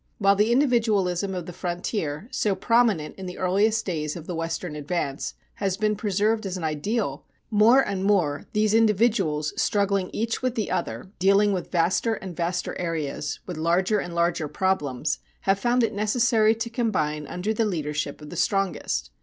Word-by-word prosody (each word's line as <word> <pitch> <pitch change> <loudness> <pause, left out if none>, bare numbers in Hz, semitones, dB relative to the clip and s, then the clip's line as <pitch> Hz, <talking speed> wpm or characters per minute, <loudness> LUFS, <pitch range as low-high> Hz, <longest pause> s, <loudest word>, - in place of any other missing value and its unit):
While 200 -1 +4
the 210 +3 +2
individualism 210 -8 +2
of 180 -2 -4
the 175 - -8
frontier, 175 -1 -3
so 205 -2 +1
prominent 220 -6 +2
in 190 - -6
the 180 - -7
earliest 205 +5 +2
days 155 -5 -2
of 165 -3 -8
the 180 - -5
Western 165 0 -3
advance, 150 -2 -3 0.2
has 195 -2 -1
been 215 0 +1
preserved 210 +1 0
as 185 0 -3
an 175 - -6
ideal, 160 +9 -2 0.3
more 225 +5 +6
and 190 -1 -2
more 180 -8 +1
these 210 0 +2
individuals 210 -9 +2
struggling 200 -3 +1
each 230 +1 -2
with 255 -1 -1
the 220 - -2
other, 190 - -3
dealing 200 +2 +4
with 185 - -3
vaster 185 +6 +1
and 190 -4 -8
vaster 175 +1 -2
areas, 155 -4 -3
with 180 -3 -6
larger 180 +6 +2
and 175 -2 -5
larger 170 -2 +1
problems, 150 -6 -1 0.2
have 195 0 +2
found 240 +2 +2
it 225 -1 0
necessary 220 +1 +3
to 230 +1 -4
combine 155 - -1
under 195 +5 -2
the 225 - +1
leadership 150 -7 -2
of 150 - -10
the - - -6
strongest. 195 -3 -1
190 Hz, 170 wpm, -25 LUFS, 170-215 Hz, 0.3 s, more